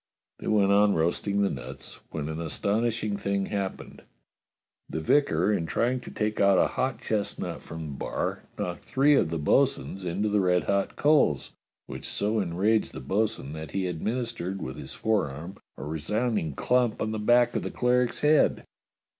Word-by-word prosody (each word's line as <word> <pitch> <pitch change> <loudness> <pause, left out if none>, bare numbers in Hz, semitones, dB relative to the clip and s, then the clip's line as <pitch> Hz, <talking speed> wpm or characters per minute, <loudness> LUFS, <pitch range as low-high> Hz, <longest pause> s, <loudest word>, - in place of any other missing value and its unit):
They - - -7
went 100 -2 +3
on 100 0 +5
roasting 100 +5 +1
the 100 - +2
nuts, 65 - -7
when 75 -2 -4
an 80 +1 -4
aston 100 +7 0
ishing 110 -3 -1
thing 100 -1 0
happened: 100 -2 -4 0.9
The - - -3
vicar, 90 - +2
in 85 -5 -1
trying 125 +7 0
to - - -10
take 105 0 -2
out 100 -1 +5
a - - +4
hot 130 0 -1
chestnut 105 -2 -3
from 80 0 -8
the 75 - -6
bar, - - -3 0.2
knocked 90 -1 -4
three 140 +3 +3
of 135 - +3
the 85 - -2
bo'sun's 75 +3 +1
into 90 +4 -1
the 105 -1 +2
red 90 -1 +2
hot 100 0 0
coals, 145 - +2 0.3
which - - -8
so 105 +2 0
enraged 100 +4 +1
the - - -6
bo'sun 95 0 -1
that 80 -1 -7
he 95 -1 0
administered 95 +1 -3
with 65 - -5
his - - -7
forearm 90 -5 -1 0.2
a - - -7
resound 105 - -1
ing 80 -3 -4
clump 125 -3 +1
on 110 - -1
the 110 - -3
back 120 +2 +4
of - - +1
the - - -4
cleric's 125 0 +1
head. 150 +1 +3
100 Hz, 180 wpm, -27 LUFS, 85-115 Hz, 0.9 s, on